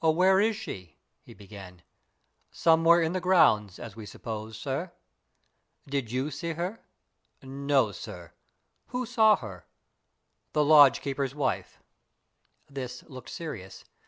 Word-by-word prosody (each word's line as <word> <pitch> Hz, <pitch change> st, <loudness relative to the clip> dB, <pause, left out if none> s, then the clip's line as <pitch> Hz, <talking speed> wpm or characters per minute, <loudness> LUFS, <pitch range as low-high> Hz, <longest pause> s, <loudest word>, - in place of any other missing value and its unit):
"Where 180 Hz, +4 st, +4 dB
is 220 Hz, +2 st, +2 dB
she?" 90 Hz, -, -8 dB, 0.2 s
he -, -, -15 dB
began. 95 Hz, -3 st, -12 dB, 0.7 s
"Somewhere 165 Hz, +1 st, +4 dB
in 160 Hz, +2 st, -1 dB
the 185 Hz, -, -2 dB
grounds, 105 Hz, -, +3 dB
as 115 Hz, -4 st, -9 dB
we 110 Hz, -2 st, -9 dB
suppose, 110 Hz, 0 st, -7 dB
sir." 140 Hz, +9 st, -4 dB, 0.9 s
"Did 135 Hz, -5 st, -3 dB
you 130 Hz, +4 st, -2 dB
see 165 Hz, +3 st, -4 dB
her?" 180 Hz, +7 st, -5 dB, 0.6 s
"No, 135 Hz, -3 st, +1 dB
sir." 90 Hz, -4 st, -10 dB, 0.5 s
"Who 250 Hz, 0 st, -3 dB
saw 220 Hz, -3 st, +5 dB
her?" 95 Hz, -, -10 dB, 0.9 s
"The 150 Hz, -1 st, +2 dB
lodge 145 Hz, -5 st, +7 dB
keeper's 135 Hz, -1 st, -3 dB
wife." 140 Hz, -3 st, -2 dB, 0.9 s
This 130 Hz, -3 st, -7 dB
looked 130 Hz, -2 st, -10 dB
serious. 105 Hz, -, -8 dB
140 Hz, 125 wpm, -28 LUFS, 110-170 Hz, 0.9 s, lodge